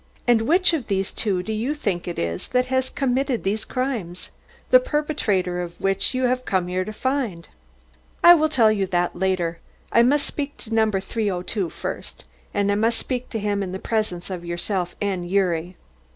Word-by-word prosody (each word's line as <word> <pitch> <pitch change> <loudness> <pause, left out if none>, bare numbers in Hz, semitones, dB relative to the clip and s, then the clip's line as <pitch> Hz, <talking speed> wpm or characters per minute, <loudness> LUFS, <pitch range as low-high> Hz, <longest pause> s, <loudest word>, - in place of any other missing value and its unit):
And 240 -2 +5
which 355 +3 +4
of 295 -8 -1
these 195 -1 -1
two 190 -5 0
do 220 - -3
you 240 +8 -1
think 195 - -2
it 175 - -4
is 85 0 -2
that 250 0 +2
has 260 0 +2
committed 265 -2 0
these 205 +3 -1
crimes 235 -10 -3 0.4
the - - +9
perpetrator 275 - 0
of 175 -1 -7
which 195 +5 0
you 255 - 0
have 255 0 +1
come 190 -6 0
here 185 +1 -1
to 215 - -6
find?" 230 -7 -2 0.8
"I 345 - +11
will 315 -2 +3
tell 235 -8 +4
you 200 -3 0
that 175 -1 0
later. 175 -2 0 0.3
I 235 - +6
must 280 +4 +3
speak 290 -1 -4
to 225 - -7
No. 220 -1 +4
302 195 -2 -2
first, - - -6 0.3
and 200 0 +1
I - - +2
must 225 +2 +2
speak 250 +1 -3
to 225 - -3
him 205 -1 -1
in 185 -2 -4
the - - -2
presence 195 -4 -2
of 180 -2 -5
yourself 175 +1 -2
and 185 -4 -2
Gyuri." 180 -2 0
205 Hz, 190 wpm, -23 LUFS, 180-255 Hz, 0.8 s, I